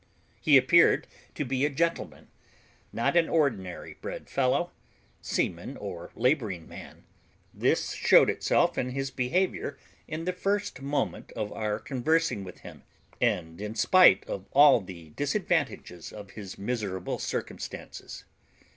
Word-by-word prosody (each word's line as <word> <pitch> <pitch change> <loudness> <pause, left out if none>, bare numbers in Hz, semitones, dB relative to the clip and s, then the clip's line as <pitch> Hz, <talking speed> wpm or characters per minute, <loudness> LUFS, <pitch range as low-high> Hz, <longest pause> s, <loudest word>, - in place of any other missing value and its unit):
He 145 -3 +7
appeared 135 +7 +5 0.3
to 150 - -2
be 130 +1 -1
a 145 - +3
gentleman, 165 +4 -2 0.6
not 115 +8 0
an 170 -1 +4
ordinary 115 - -1
bred - - -7
fellow, 140 +7 +1 0.5
seaman, - - -2
or 85 0 -7
labouring 115 - 0
man; - - -11 0.5
this - - 0
showed - - +5
itself - - +1
in 125 - -1
his 135 0 -3
behaviour 145 +1 -1 0.3
in 160 +1 -5
the 185 - -1
first 200 -4 -2
moment 140 +2 -2
of 105 -2 -4
our 105 -1 -2
conversing 140 +1 0
with 90 - -11
him, - - -11 0.4
and 80 +2 0
in 105 +1 -5
spite 185 +7 +6
of 95 -1 -6
all 140 -4 +7
the 90 -4 -11
disadvantages 145 - -2
of 100 -2 -10
his 100 -4 -9
miserable 100 -4 -3
circumstances. - - -6
130 Hz, 130 wpm, -28 LUFS, 100-155 Hz, 0.6 s, He